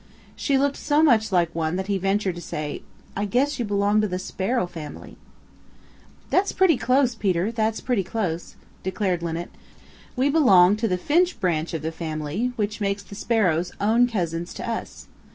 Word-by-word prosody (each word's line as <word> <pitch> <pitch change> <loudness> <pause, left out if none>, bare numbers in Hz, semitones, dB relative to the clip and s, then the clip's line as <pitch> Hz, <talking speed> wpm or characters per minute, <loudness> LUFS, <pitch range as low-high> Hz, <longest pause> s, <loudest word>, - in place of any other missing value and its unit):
She 280 -2 +1
looked 280 +1 +1
so 295 +1 +2
much 220 -8 +4
like 170 -3 +2
one 160 0 -1
that 190 +1 -2
he 195 -1 -1
ventured 195 0 0
to 175 - -8
say, 150 -3 -5 0.3
"I 200 - -1
guess 265 +7 0
you 240 - 0
belong 205 +1 +2
to 215 - +1
the 180 -2 -3
Sparrow 195 +5 -1
family." 160 -4 -9 1.2
"That's 390 +2 +2
pretty 370 -4 +4
close, 255 +1 +2
Peter. 195 -2 0
That's 225 -1 -1
pretty 240 -7 0
close," 180 -4 -3 0.3
declared 190 -2 -1
Linnet. 170 +1 -4 0.6
"We 260 +2 +2
belong 205 - +6
to 225 +1 0
the 180 -3 0
Finch 345 - +1
branch 165 -3 -1
of 155 - -4
the 160 - -2
family, 160 +8 -3
which 210 -1 -2
makes 200 0 -1
the - - -13
sparrows 180 -6 0
own 230 +4 +3
cousins 175 -6 -3
to - - -6
us. 230 -1 -5
200 Hz, 175 wpm, -24 LUFS, 175-235 Hz, 1.2 s, belong